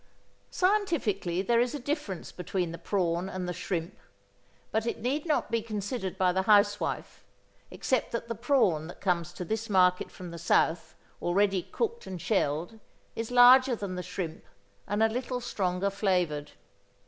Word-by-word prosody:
Scientifically 275 - +1
there 235 +3 +3
is 245 +3 +1
a - - -4
difference 265 - -4
between 180 -1 -3
the 170 - -7
prawn 180 -2 -1
and 185 -1 -4
the 180 - -2
shrimp; 170 +1 -4 0.7
but 220 +1 0
it - - -1
need 275 +8 -1
not 305 - 0
be 230 - +1
considered 210 -2 -4
by 185 -1 +3
the 190 +1 +1
housewife, 205 +1 +2 0.5
except 260 -3 -1
that 235 0 -3
the 230 - -2
prawn, 205 - +2
that 175 - -10
comes 175 -4 0
to 180 - -6
this 220 +5 -3
market 180 -2 +3
from 180 -2 -9
the 170 - -8
South 160 -1 +1 0.3
already 195 +1 +2
cooked 470 - -3
and 185 -2 -6
shelled, 175 +2 -1 0.4
is 225 0 -3
larger 250 +1 +7
than 200 -4 -5
the 180 - -3
shrimp, 180 -3 -5 0.4
and 205 +2 +1
a - - +6
little 250 +2 -3
stronger 195 -4 -1
flavored. 180 -7 0
200 Hz, 160 wpm, -29 LUFS, 180-235 Hz, 0.7 s, larger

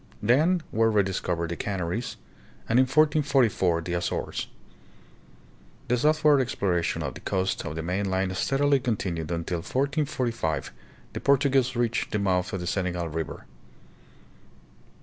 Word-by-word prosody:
Then 155 - +3
were 115 +1 +3
rediscovered 95 -5 0
the - - -2
Canaries 95 +4 -3 0.5
and 115 +2 +3
in 130 - +6
1444 135 - +2
the 85 +1 -4
Azores. 85 0 -2 1.4
The 125 - +4
southward 150 +2 +4
exploration 95 -9 -1
of - - -3
the - - -10
coast 95 0 -1
of 80 -1 -5
the 80 - -4
mainland 95 +1 -1
steadily 140 +5 +2
continued 95 - -2
until 85 +1 -2
in - - -5
1445 125 - -1 0.4
the - - -4
Portuguese 135 -2 +2
reached 120 0 0
the 105 - 0
mouth 90 -3 0
of 95 - -3
the - - -4
Senegal 90 -2 -2
River. 80 +1 -5
100 Hz, 130 wpm, -26 LUFS, 90-130 Hz, 1.4 s, in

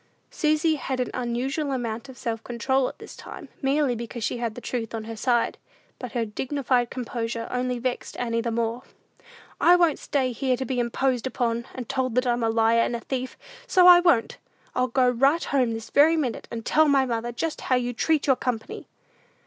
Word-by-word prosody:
Susy 310 0 +1
had 265 -2 -3
an 250 - -1
unusual 255 +4 -2
amount 235 -1 -3
of 260 - -11
self 225 -1 -4
control 255 +2 0
at - - -13
this - - -11
time, 300 -7 -10
merely 275 -1 +2
because 235 0 -6
she - - -1
had 230 -2 -3
the - - -6
truth 235 -2 -4
on 220 - -4
her 225 +1 -7
side. 240 +1 0 0.4
But 250 -1 -7
her 235 -2 0
dignified 250 +2 -1
composure 230 -2 -4
only 250 0 -1
vexed 250 +1 -4
Annie 230 -1 -1
the 235 - -2
more. 230 +1 -1 0.8
"I 350 - +6
won't 345 -4 +3
stay 265 -3 0
here 255 +1 0
to 260 - -3
be 255 0 -2
imposed 250 +1 0
upon, 235 -1 -2
and 250 -3 -6
told 260 -3 -1
that 250 +1 +2
I'm 240 -1 +1
a 225 - +1
liar 225 +1 +3
and 240 - 0
a - - -3
thief; 260 0 -4 0.3
so 365 -1 +5
I 355 -1 +10
won't! 340 -10 +2 0.3
I'll 255 - +1
go 255 +1 +2
right 270 +7 +3
home 250 -5 +1
this 225 -1 -8
very 315 +3 +5
minute, 260 -7 -2
and 230 0 -6
tell 315 0 +4
my 275 -2 +4
mother 235 -1 -2
just 305 +7 -3
how 255 - +1
you 245 0 -1
treat 310 +5 +1
your 270 - +4
company!" 245 -3 -4
250 Hz, 205 wpm, -25 LUFS, 235-270 Hz, 0.8 s, I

